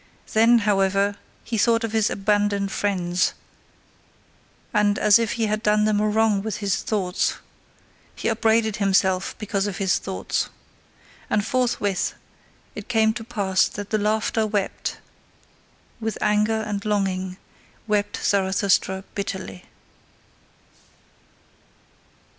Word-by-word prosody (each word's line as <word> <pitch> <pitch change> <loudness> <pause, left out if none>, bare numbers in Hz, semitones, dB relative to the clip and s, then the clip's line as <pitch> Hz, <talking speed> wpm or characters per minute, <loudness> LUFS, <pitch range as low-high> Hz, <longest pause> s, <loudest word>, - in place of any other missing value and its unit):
Then, 230 +2 +6
however, 200 0 +2 0.3
he 230 -2 -3
thought 230 +2 +3
of 225 - -2
his 220 -2 +2
abandoned 205 -1 0
friends 180 -3 0 1.4
and 210 -1 +2
as 210 +1 +5
if 230 -2 0
he 230 -2 0
had 215 0 -1
done 210 -1 +3
them 215 -1 +2
a 210 - +2
wrong 215 -2 +2
with 210 -1 -4
his 200 -2 0
thoughts, 190 -4 -1 0.8
he - - -3
upbraided 220 -1 +2
himself 190 -2 +1
because 205 -2 -2
of 200 - -4
his 190 -2 +1
thoughts. 190 - -3 0.8
And 210 -1 +1
forthwith 230 -6 0 0.6
it - - -8
came 220 -2 +3
to 225 - -6
pass 200 -5 +1
that 205 -1 -8
the 215 - +2
laugher 215 +1 0
wept 205 -2 -2 1.0
with 220 -2 -3
anger 210 +1 +2
and 205 -2 -4
longing 190 -3 -1 0.5
wept 205 -1 0
Zarathustra 190 -1 +1
bitterly. 190 - -5
205 Hz, 120 wpm, -23 LUFS, 195-220 Hz, 1.4 s, Then